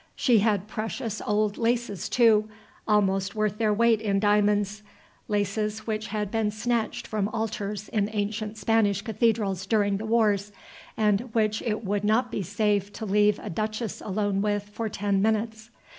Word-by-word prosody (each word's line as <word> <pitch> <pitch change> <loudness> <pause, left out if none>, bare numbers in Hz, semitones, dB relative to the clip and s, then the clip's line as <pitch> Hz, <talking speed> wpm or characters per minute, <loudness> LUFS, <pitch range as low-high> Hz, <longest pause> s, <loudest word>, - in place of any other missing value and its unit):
She 240 -4 +4
had 205 -2 +1
precious 220 0 -4
old 210 0 +1
laces, 230 -5 -1
too, 220 -3 +4 0.4
almost 195 -2 +1
worth 215 -1 -1
their 220 -2 +2
weight 225 +1 +3
in 200 -2 +1
diamonds; 205 0 +2 0.5
laces 210 +1 -1
which 215 0 -3
had 210 -1 -3
been 225 -2 +1
snatched 225 +2 -2
from 210 -2 -1
altars 210 -2 -3
in 210 -3 0
ancient 215 +1 -3
Spanish 210 -3 +2
cathedrals 210 -4 0
during 205 -2 +2
the 220 +2 -5
wars, 210 -3 +2 0.5
and 215 +2 +1
which 215 -1 +1
it 220 -1 -2
would 200 +1 -1
not 225 +4 +2
be 205 - -2
safe 205 +1 0
to 220 - -6
leave 210 +1 +3
a - - -5
duchess 215 +4 -3
alone 205 -1 -1
with 205 0 -1
for 220 +1 -4
ten 200 -1 0
minutes. 220 +1 -1
210 Hz, 160 wpm, -26 LUFS, 205-220 Hz, 0.5 s, She